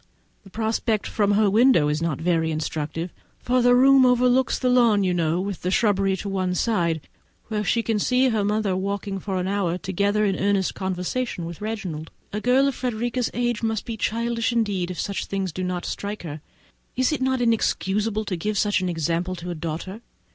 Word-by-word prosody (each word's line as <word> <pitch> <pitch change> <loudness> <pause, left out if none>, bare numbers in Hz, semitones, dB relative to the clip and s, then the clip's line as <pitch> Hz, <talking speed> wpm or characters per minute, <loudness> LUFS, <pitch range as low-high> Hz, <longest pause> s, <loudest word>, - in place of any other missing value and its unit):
the 195 - -15
prospect 220 +1 -1
from 205 -1 +1
her 210 +1 +4
window 215 - +4
is 150 +1 -1
not 165 -4 -1
very 165 -1 +1
instructive, 160 +2 -3 0.2
for 250 +1 +1
that 245 0 +5
room 270 +1 +6
overlooks 250 +1 +3
the 255 - -1
lawn, 235 -5 +4
you 185 -1 +1
know, 170 0 +1
with 195 0 -4
the 180 - -1
shrubbery 195 -2 +2
on 200 - -3
one 185 -2 -1
side, 170 -8 0 0.5
where 210 -1 -1
she 230 +4 +1
may 220 -2 +1
see 255 +4 +3
her 220 -3 0
mother 205 -2 0
walking 195 +1 -3
for 190 0 -3
an 180 - -2
hour 190 -3 0
together 200 +4 0
in 195 -2 +1
earnest 200 -1 +1
conversation 190 +2 -3
with 170 +2 -8
Reginald. 185 -8 -4 0.2
A 210 - -2
girl 260 +4 +4
of 275 - 0
Frederica's 245 0 -2
age 240 -2 0
must 225 -2 -1
be 230 - -4
childish 230 +2 -1
indeed, 205 -6 0
if 180 -4 -6
such 200 - -3
things 195 -2 -2
do 185 +4 -4
not 180 -1 -3
strike 205 0 -4
her. 155 -2 -7 0.5
Is 255 +3 +2
it 305 - -2
not 260 0 +1
inexcusable 215 -2 0
to 190 - -2
give 210 +5 -2
such 205 -1 +2
an 185 - -1
example 170 +2 -1
to 175 0 -6
a - - -2
daughter? 170 +6 -5
200 Hz, 200 wpm, -24 LUFS, 180-230 Hz, 0.5 s, room